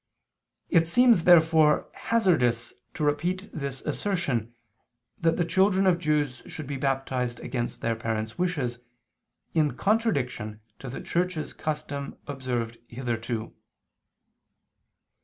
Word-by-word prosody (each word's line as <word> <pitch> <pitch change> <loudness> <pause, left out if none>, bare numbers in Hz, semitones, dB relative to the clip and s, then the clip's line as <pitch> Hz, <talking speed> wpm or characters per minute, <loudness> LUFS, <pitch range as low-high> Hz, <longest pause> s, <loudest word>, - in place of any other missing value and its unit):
It 165 -2 +4
seems 235 -2 +5
therefore 160 -3 +5
hazardous 155 - +1 0.2
to 155 - -2
repeat 175 +7 0
this 140 -3 -4
assertion, 150 - -1 0.7
that 165 -1 +2
the 175 - +1
children 190 +3 +3
of 180 -2 +4
Jews 150 -5 0
should 155 - -6
be 140 +1 -4
baptized 130 -3 -1
against 120 -1 -3
their 115 0 0
parents' 110 -1 -3
wishes, 145 -10 -1 0.7
in 150 -5 +1
contradiction 140 - 0 0.2
to 135 - -7
the 125 - -6
Church's 175 -2 -1
custom 150 -2 -4
observed 125 -4 -3
hitherto. 115 -2 -3
145 Hz, 110 wpm, -27 LUFS, 125-175 Hz, 0.7 s, seems